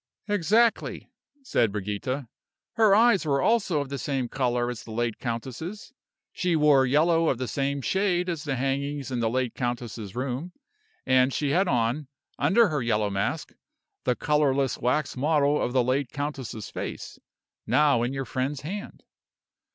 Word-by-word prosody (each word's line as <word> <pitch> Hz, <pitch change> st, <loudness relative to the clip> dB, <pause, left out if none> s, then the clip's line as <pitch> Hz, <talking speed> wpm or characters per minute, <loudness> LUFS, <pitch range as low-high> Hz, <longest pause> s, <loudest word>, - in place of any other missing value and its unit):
"Exactly," 210 Hz, +4 st, +1 dB, 0.3 s
said 115 Hz, -, +1 dB
Brigida. 105 Hz, +6 st, -3 dB, 0.5 s
"Her 220 Hz, -3 st, +5 dB
eyes 230 Hz, -2 st, +5 dB
were 140 Hz, -3 st, +1 dB
also 195 Hz, -4 st, +2 dB
of 140 Hz, -, -6 dB
the 140 Hz, -1 st, -4 dB
same 135 Hz, -4 st, -2 dB
color 125 Hz, -2 st, 0 dB
as 120 Hz, -, -7 dB
the -, -, -13 dB
late 115 Hz, 0 st, -2 dB
countess's; 130 Hz, -, -5 dB, 0.4 s
she 180 Hz, -2 st, 0 dB
wore 145 Hz, -4 st, +5 dB
yellow 165 Hz, +4 st, +3 dB
of 130 Hz, -, 0 dB
the 130 Hz, 0 st, -3 dB
same 140 Hz, +3 st, -1 dB
shade 185 Hz, 0 st, +1 dB
as 165 Hz, -4 st, -3 dB
the 140 Hz, -3 st, -2 dB
hangings 135 Hz, +1 st, -2 dB
in 125 Hz, -, -1 dB
the 115 Hz, -1 st, +1 dB
late 125 Hz, 0 st, -1 dB
countess's 120 Hz, -4 st, -4 dB
room, 130 Hz, +7 st, -3 dB, 0.5 s
and 130 Hz, 0 st, +4 dB
she 145 Hz, +1 st, -1 dB
had 185 Hz, +5 st, +2 dB
on, 125 Hz, +2 st, 0 dB, 0.3 s
under 195 Hz, +9 st, +4 dB
her 150 Hz, -4 st, -1 dB
yellow 105 Hz, -3 st, 0 dB
mask, 100 Hz, 0 st, -2 dB, 0.5 s
the 125 Hz, -, +1 dB
colorless 140 Hz, -3 st, +1 dB
wax 145 Hz, +4 st, 0 dB
model 145 Hz, +1 st, +2 dB
of -, -, -1 dB
the 130 Hz, -1 st, +3 dB
late 130 Hz, +1 st, 0 dB
countess's 140 Hz, -7 st, -5 dB
face, -, -, -6 dB, 0.5 s
now 145 Hz, -5 st, +4 dB
in 120 Hz, +2 st, 0 dB
your 135 Hz, 0 st, -3 dB
friend's 130 Hz, +3 st, -2 dB
hand. 200 Hz, +8 st, -7 dB
135 Hz, 160 wpm, -26 LUFS, 125-155 Hz, 0.5 s, Her